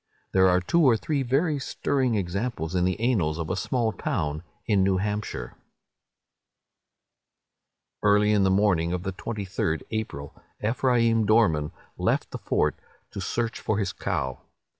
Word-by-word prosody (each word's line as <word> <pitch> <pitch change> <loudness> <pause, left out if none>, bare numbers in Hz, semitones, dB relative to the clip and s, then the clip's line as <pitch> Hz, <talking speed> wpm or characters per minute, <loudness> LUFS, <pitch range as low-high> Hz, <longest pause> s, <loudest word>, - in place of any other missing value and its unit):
There 95 0 +5
are 90 0 +4
two 170 - +2
or 130 -7 +5
three 145 +4 -1
very 140 +4 +1
stirring 130 -2 0
examples 95 -2 -2
in 90 -1 +2
the 95 +3 0
annals 100 -11 +1
of 85 -2 -3
a - - 0
small 120 -4 0
town 75 -6 -2 0.2
in 105 -4 +3
New 95 -1 +2
Hampshire:— 105 +2 -3 2.5
"Early 105 0 +4
in 105 -1 +3
the 95 - +3
morning 95 -4 +2
of 90 -1 -3
the 95 -1 -3
23d 95 -6 -3
April, 100 -11 -4 0.3
Ephraim 115 -1 +2
Dorman 90 -10 +3 0.3
left - - 0
the - - -5
fort - - +1 0.4
to - - -5
search 115 -1 -2
for 105 - -1
his 100 -4 -1
cow. 65 -1 -2
105 Hz, 145 wpm, -26 LUFS, 90-115 Hz, 2.5 s, There